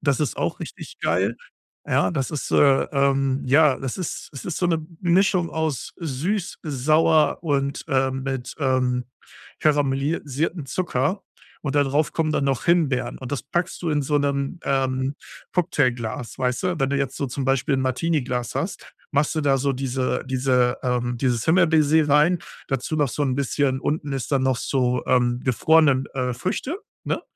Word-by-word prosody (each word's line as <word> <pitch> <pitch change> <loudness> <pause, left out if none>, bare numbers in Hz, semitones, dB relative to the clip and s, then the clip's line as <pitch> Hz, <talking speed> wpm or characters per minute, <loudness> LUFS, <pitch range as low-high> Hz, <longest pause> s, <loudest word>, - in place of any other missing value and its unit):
Das 140 -1 +1
ist 150 - -1
auch - - -2
richtig - - -9
geil, 95 +7 +1 0.5
ja. 95 - +2
Das 135 - -2
ist 145 -5 -4
äh, 135 -2 +5
ähm, 135 -1 +1
ja, 145 +1 +5
das 135 -2 -4
ist 180 -4 -5
es 135 - -8
ist 175 - -3
so 180 - +1
'ne 165 -2 0 0.2
Mischung 180 0 +3
aus 160 -5 -2
süß, 170 +6 -2
sauer 155 +2 +3
und, 140 -3 -1
ähm, 130 -1 +1
mit, 135 -2 -4
ähm, 125 -2 +1 0.5
karamellisiertem 145 +2 0
Zucker 175 +3 -1 0.4
und 140 -2 -3
da 145 - +5
drauf 150 +3 +1
kommen 155 -1 0
dann 140 - 0
noch 135 -2 0
Himbeeren 165 -7 +1
und 130 0 -7
das 140 - -2
packst 170 +4 -2
du 170 - 0
in 145 - +1
so 145 +1 +1
'nem, 140 +3 -1
ähm, 130 0 0 0.4
Cocktailglas, 125 -10 -1
weißt 125 +5 0
du? 180 -3 -1
Wenn 135 0 +1
du 140 - +1
jetzt 140 -2 -2
so 140 - -2
zum 130 +2 -4
Beispiel 135 +2 +1
'n - - 0
Martini-Glas 130 -3 -1
hast, - - -4 0.2
machst 145 +3 +1
du 155 - 0
da 140 -1 +3
so 140 +1 0
diese 130 0 -1
diese, 125 -1 +2
ähm, 125 -1 -1
dieses 120 -2 0
Himbeer-Baiser 160 -3 +4
rein, 150 +5 +4 0.3
dazu 135 +3 -2
noch 145 -4 +1
so 150 - -3
'n 130 -2 0
bisschen 140 -1 0
unten 145 -2 -2
ist 135 0 -4
dann 135 -2 +2
noch 130 -1 +2
so, 125 -1 0
ähm, 125 -1 +2
gefrorenen, 140 +1 +4
äh, 125 -2 -1
Früchte, 190 - -3 0.3
ne? - - -1
140 Hz, 175 wpm, -23 LUFS, 130-155 Hz, 0.5 s, äh